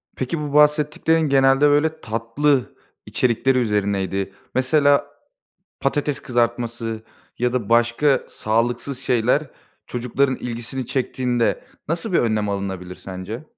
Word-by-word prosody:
Peki, 135 +5 -3
bu 145 -1 -4
bahsettiklerin 150 +2 +3
genelde, 135 0 +4
böyle, 155 +2 +1
tatlı 115 +5 0 0.3
içerikleri 130 +2 +1
üzerineydi. 100 -3 -1 0.2
Mesela, 140 +2 +3 0.7
patates 145 +1 -1
kızartması 115 -2 -1 0.4
ya 125 0 +1
da 120 -5 -2
başka 120 +4 +3
sağlıksız 120 +4 -1
şeyler 125 +3 +2 0.4
çocukların 125 +2 0
ilgisini 120 +1 -5
çektiğinde 125 -2 -1 0.2
nasıl 170 +2 -2
bir - - +4
önlem 110 -3 +1
alınabilir 95 -2 -4
sence? 95 +8 -7
125 Hz, 105 wpm, -22 LUFS, 115-140 Hz, 0.7 s, genelde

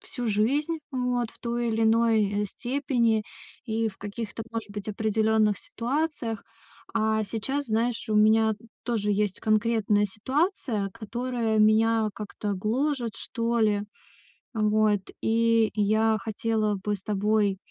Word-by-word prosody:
всю 275 -10 -5
жизнь, 275 +10 +1
вот, 250 -3 -1
в - - -22
той 235 0 -2
или 225 0 0
иной, 220 -2 +3
э, - - 0
степени, 240 -2 0 0.4
и 225 -1 0
в 195 - -11
каких-то, 215 +2 -6
может 225 -2 -5
быть, 205 -1 -6
определённых 220 0 +2
ситуациях. 245 -3 -3 0.5
А 220 -1 +1
сейчас, 265 +8 -3
знаешь, 230 +2 0
у - - +1
меня 220 +1 +5 0.3
тоже 220 -4 -1
есть 205 -1 0
конкретная 215 -1 +2
ситуация, 225 - -1
которая 230 0 -2
меня 220 +1 +4
как-то 210 -1 -4
гложет, 235 +4 -1
что 235 -1 -2
ли. 210 -2 +2 0.7
Вот, 215 -2 +2 0.2
и 230 -1 +3
я 220 +1 +3
хотела 215 0 -1
бы 205 +2 -2
с 195 - -13
тобой, 210 -1 +1
220 Hz, 130 wpm, -27 LUFS, 210-235 Hz, 0.7 s, меня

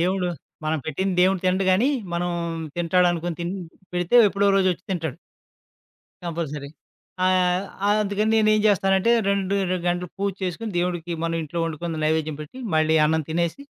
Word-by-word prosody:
దేవుడు 185 +1 +1 0.4
మనం 155 0 0
పెట్టంది 185 +5 -1
దేవుడు 185 0 +3
తినడు 185 +1 +2
గానీ, 220 +9 +3 0.3
మనం 175 +1 -1 0.5
తింటాడునుకోని 175 -1 +1
తిన్ 175 +3 -2 0.4
పెడితే 175 +6 +2
ఎప్పుడో 200 +1 +2
రోజొచ్చి 185 -3 +1
తింటాడు. 160 -7 -2 1.1
కంపల్సరీ. 155 -4 -4 0.6
ఆహ్, 185 0 +2 0.4
అందుకని 210 +2 0
నేనేం 215 -1 +4
జేస్తానంటే 195 +2 +3 0.2
రెండు 200 0 0 0.2
రెండు 185 - +1
గంటలు 175 0 -1
పూజ 200 0 0
చేసుకొని 200 +5 -3
దేవుడికి 175 -1 -2
మనం 165 0 -1
ఇంట్లో 155 +3 -5
వండుకుంది 165 0 -4
నైవేద్యం 155 -1 0
పెట్టి 150 - -12 0.2
మళ్ళీ 155 0 +3
అన్నం 160 +1 +2
తినేసి 170 - -1
180 Hz, 140 wpm, -24 LUFS, 165-195 Hz, 1.1 s, నేనేం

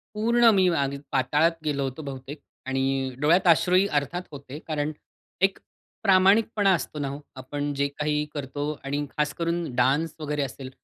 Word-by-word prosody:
पूर्ण 235 +2 +4
मी 190 -1 +4
अग 140 0 0 0.2
पाताळात 145 +6 +3
गेलो 145 -2 0
होतो 135 +3 -4
बहुतेक. 140 0 -7 0.3
आणि 135 0 0
डोळ्यात 170 +6 +3
अश्रूहि 180 +3 +5
अर्थात 165 +6 -5
होते 140 0 -9
कारण, 150 -1 -1 0.5
एक 195 0 +3 0.5
प्रामाणिकपणा 200 +1 +4
असतो 155 -2 -3
ना 145 - -2
हो, 140 +1 -5 0.2
आपण 145 +2 -4
जे 140 0 0
काही 150 0 0
करतो 145 +1 -3
आणि 145 +1 -2
खास 150 0 0
करून 170 0 -1
डान्स 140 +6 +2
वगैरे 150 -1 -2
असेल, 135 0 -7
150 Hz, 155 wpm, -26 LUFS, 140-170 Hz, 0.5 s, अश्रूहि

